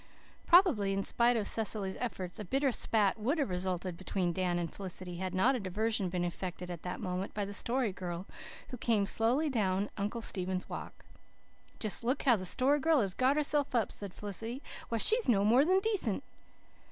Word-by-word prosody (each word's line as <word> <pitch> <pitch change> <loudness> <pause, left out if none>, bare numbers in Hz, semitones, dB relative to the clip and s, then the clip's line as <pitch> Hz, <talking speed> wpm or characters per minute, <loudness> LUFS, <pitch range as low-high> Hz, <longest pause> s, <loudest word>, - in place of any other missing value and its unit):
Probably, 320 - +5
in 195 0 -1
spite 240 +3 +2
of 215 - -1
Cecily's 210 -3 -1
efforts, 190 -7 -4
a - - -4
bitter 270 +7 +1
spat 215 -3 +1
would 260 +10 0
have 280 -10 -1
resulted 180 -1 -2
between 185 -1 -1
Dan 180 -1 0
and 170 -2 -3
Felicity, 185 -2 -5
had 185 0 -3
not 235 +9 +4
a 255 - -1
diversion 205 0 -1
been 175 0 -1
effected 180 0 -5
at 170 -2 -7
that 180 - -5
moment 185 +1 -4
by 205 -1 -1
the 200 - -6
Story 235 0 0
Girl, 180 0 -5 0.4
who 250 - -6
came 220 -4 +1
slowly 235 +9 +1
down 205 -6 0
Uncle 215 +3 -2
Stephen's 185 -2 0
Walk. - - -8 0.7
"Just 215 0 0
look 255 +4 0
how 250 -4 +5
the 185 -3 -3
Story 275 +8 +3
Girl 320 +1 +3
has 195 -3 -1
got 260 +6 +2
herself 290 -2 +1
up!" 225 -4 +1
said 200 -2 -6
Felicity. 225 +6 -3 0.3
"Why, 230 - 0
she's 450 - +4
no 200 -4 +4
more 240 +6 +5
than 370 +5 +3
decent!" 385 - -1
210 Hz, 190 wpm, -32 LUFS, 185-250 Hz, 0.7 s, Probably